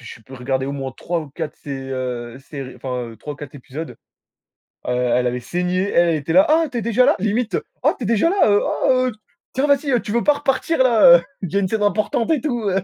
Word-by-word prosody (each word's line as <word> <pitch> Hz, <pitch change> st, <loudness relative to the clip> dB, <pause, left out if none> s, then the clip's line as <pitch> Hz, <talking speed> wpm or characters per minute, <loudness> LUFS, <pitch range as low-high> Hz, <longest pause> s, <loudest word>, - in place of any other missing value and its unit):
je 120 Hz, -, -10 dB
sais 115 Hz, -, -18 dB
plus, 130 Hz, +5 st, -12 dB
regardé 130 Hz, +1 st, -2 dB
au 140 Hz, -, -3 dB
moins 135 Hz, -2 st, -5 dB
3 170 Hz, -1 st, -2 dB
ou 150 Hz, -, -9 dB
4 160 Hz, +1 st, -6 dB
sé 145 Hz, -, -11 dB
heu, 130 Hz, -2 st, -5 dB
séries, 135 Hz, -1 st, -8 dB
enfin 125 Hz, -3 st, -5 dB
3 145 Hz, +5 st, -7 dB
ou -, -, -17 dB
4 145 Hz, -1 st, -10 dB
épisodes. 145 Hz, +4 st, -8 dB, 0.9 s
Heu, -, -, 0 dB
elle 125 Hz, 0 st, +1 dB
avait 125 Hz, +1 st, -2 dB
saigné, 180 Hz, +8 st, -1 dB
elle 170 Hz, 0 st, +3 dB
elle 165 Hz, -, +2 dB
était 155 Hz, +1 st, -3 dB
là: 185 Hz, +2 st, +6 dB
«Ah 325 Hz, +1 st, +4 dB
tu 245 Hz, -, -4 dB
es -, -, -1 dB
déjà 235 Hz, +2 st, +3 dB
là?», 290 Hz, -, +4 dB
limite: 215 Hz, +3 st, 0 dB, 0.3 s
«Ah -, -, +4 dB
tu 245 Hz, -, -6 dB
es -, -, -2 dB
déjà 230 Hz, +8 st, +3 dB
là? 390 Hz, -, 0 dB
Heu, 205 Hz, -, +4 dB
ah, -, -, -1 dB, 0.2 s
heu, -, -, -1 dB, 0.4 s
tiens 270 Hz, +3 st, +1 dB
vas-y 275 Hz, -3 st, +2 dB
tu -, -, -6 dB
veux 235 Hz, +2 st, +1 dB
pas 295 Hz, -, +5 dB
repartir 285 Hz, +3 st, -1 dB
là, 220 Hz, -9 st, +7 dB
heu, 170 Hz, -, -6 dB, 0.2 s
il 185 Hz, -, -4 dB
y -, -, -5 dB
a -, -, +4 dB
une 190 Hz, -, 0 dB
scène 215 Hz, +2 st, -1 dB
importante 215 Hz, +2 st, 0 dB
et 295 Hz, -6 st, +1 dB
tout». 240 Hz, -8 st, -1 dB
175 Hz, 255 wpm, -20 LUFS, -, 0.9 s, là